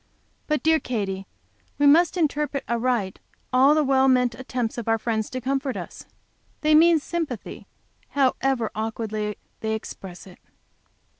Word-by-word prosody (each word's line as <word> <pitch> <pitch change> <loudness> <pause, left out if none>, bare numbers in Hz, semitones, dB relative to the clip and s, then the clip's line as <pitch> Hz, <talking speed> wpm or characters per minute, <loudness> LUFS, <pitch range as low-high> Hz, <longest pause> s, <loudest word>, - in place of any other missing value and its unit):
But, 300 -1 0
dear 320 0 +4
Katy, 195 -7 -3 0.5
we 290 - +2
must 330 +5 +5
interpret 295 -3 0
aright 235 -5 -1 0.3
all 270 +4 +6
the 310 - +3
well 265 -1 +3
meant 250 -2 +3
attempts 245 -1 -3
of 230 - -7
our 225 0 +3
friends 220 -1 -2
to 255 - -4
comfort 270 +1 -2
us. - - -9 0.5
They 305 0 +3
mean 330 +2 +6
sympathy, 300 - -5 0.4
however 265 -3 +1
awkwardly 215 -1 -3 0.2
they 220 0 -1
express 190 -4 -9
it." 185 -2 -15
255 Hz, 140 wpm, -24 LUFS, 220-285 Hz, 0.5 s, all